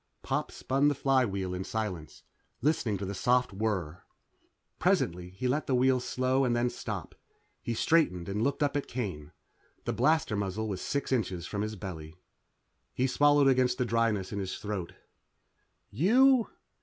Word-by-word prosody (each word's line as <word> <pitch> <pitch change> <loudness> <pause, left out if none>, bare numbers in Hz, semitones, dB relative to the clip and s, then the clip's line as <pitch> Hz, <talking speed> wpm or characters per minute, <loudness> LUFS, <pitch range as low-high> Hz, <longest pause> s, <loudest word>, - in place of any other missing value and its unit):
Pop - - -1
spun 135 +2 +1
the 145 - +2
flywheel 115 -10 +1
in 90 +1 -3
silence, 95 -9 -5 0.4
listening 125 -8 +1
to 100 - -4
the 100 - -4
soft 125 +3 +1
whir. 95 -6 -2 0.8
Presently, 90 +1 +1
he 95 +8 -4
let 145 +5 0
the 130 - +2
wheel 130 +1 +3
slow 130 +2 0
and 120 -2 +1
then 120 +1 +1
stop. 105 -7 -6 0.5
He 120 - -3
straightened 110 - +2
and 100 +2 -2
looked 140 +4 +1
up 145 0 0
at 145 - -1
Kane. 95 - -5 0.5
The - - -1
blaster 155 -8 +2
muzzle 100 +2 -2
was 95 -3 -4
six 140 -1 -2
inches 90 -8 -1
from 100 +1 -3
his 110 +1 -3
belly. 80 -6 -8 0.8
He 130 - +1
swallowed 145 +1 +4
against 125 -2 +3
the 125 - 0
dryness 115 -5 0
in 100 - -2
his 95 -1 -4
throat. 100 -5 -5 1.0
"You 240 - +4
115 Hz, 160 wpm, -29 LUFS, 95-130 Hz, 1.0 s, swallowed